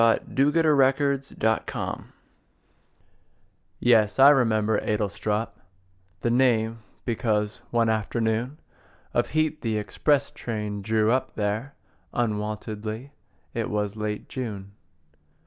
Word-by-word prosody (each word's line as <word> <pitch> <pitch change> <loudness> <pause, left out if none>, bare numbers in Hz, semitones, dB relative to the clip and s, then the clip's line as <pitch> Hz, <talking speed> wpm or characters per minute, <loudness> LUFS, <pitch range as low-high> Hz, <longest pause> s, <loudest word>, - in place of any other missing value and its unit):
Edward 140 +7 +3
Thomas 140 -2 +3
Adlestrop 110 0 +1 2.2
YES, 110 -4 +4
I 135 +2 +9
remember 110 -5 +2
Adlestrop 105 +1 -1 0.7
The 120 - +1
name 115 -3 +2 0.3
because 105 -3 -1
one 115 -1 +2
afternoon 110 +4 0 0.6
Of - - +2
heat 155 0 +1
the 110 -2 -1
express 140 +7 +1
train 105 -3 -4
drew 110 +2 +2
up 130 +1 0
there 110 +6 -2 0.4
Unwontedly. 110 +2 -3 0.4
It - - -2
was 105 -1 -1
late 105 -1 -4
June. 105 -6 -5
110 Hz, 95 wpm, -26 LUFS, 105-130 Hz, 2.2 s, I